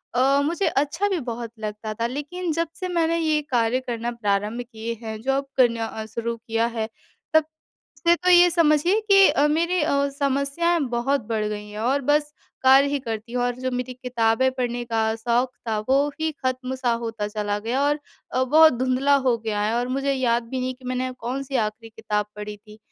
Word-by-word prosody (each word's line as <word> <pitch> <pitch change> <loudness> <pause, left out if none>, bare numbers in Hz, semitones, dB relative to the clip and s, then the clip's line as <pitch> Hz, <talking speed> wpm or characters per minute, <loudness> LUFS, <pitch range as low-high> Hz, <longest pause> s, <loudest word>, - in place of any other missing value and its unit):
अ, 275 +3 +4
मुझे 340 +6 0
अच्छा 295 +8 0
भी 375 - 0
बहुत 230 -1 -5
लगता 215 0 -5
था 230 +2 -1
लेकिन 300 +7 -4
जब 335 0 0
से 370 - -3
मैंने 335 -1 +1
ये 310 -2 +1
कार्य 240 0 +2
करना 235 0 -2
प्रारंभ 210 +1 -1
किए 225 +1 -4
हैं, 220 -1 -5
जॉब 270 +3 0
करना 230 -3 +3
अ, 220 0 -6
शुरू 230 +1 -4
किया 225 0 -1
है, 220 0 -1 0.5
तब 315 -1 +5 0.5
से 340 0 +4
तो 365 +1 +1
ये 355 0 +7
समझिए 335 +4 +3
कि 390 -1 +8
अ, 290 - +3
मेरी 340 +3 +1
अ, 280 -1 +1
समस्याएँ 280 +5 +1 0.2
बहुत 270 +4 +1
बढ़ 220 -2 0
गई 210 0 -5
हैं। 210 0 -8
और 260 +5 +1
बस 295 0 +2 0.3
कार्य 265 +2 +6
ही 285 0 0
करती 230 -2 -6
हूँ 245 0 0
और 245 0 0
जो 255 - -1
मेरी 250 0 -3
किताबें 250 0 +1
पढ़ने 245 -2 -2
का 225 -1 0
शौक 240 +3 0 0.2
था, 215 -1 0
वो 275 +2 +3
ही 315 0 +1
ख़त्म 255 0 -1
सा 255 -2 0
होता 225 -2 -3
चला 210 -1 -2
गया 235 +6 -1
और 295 +1 +1 0.3
अ, 255 - +1
बहुत 315 +3 +6
धुंधला 260 +2 +2
हो 240 -2 +4
गया 220 -2 -2
है 215 +2 0
और 245 +1 -1
मुझे 275 +2 0
याद 240 -3 +1
भी 260 0 -3
नहीं 255 0 -2
कि 255 - -21
मैंने 255 0 -2
कौन-सी 265 +3 -3
आख़िरी 220 +1 -2
किताब 210 -2 -2
पढ़ी 210 0 -6
थी। 210 +1 -16
255 Hz, 200 wpm, -24 LUFS, 225-285 Hz, 0.5 s, कि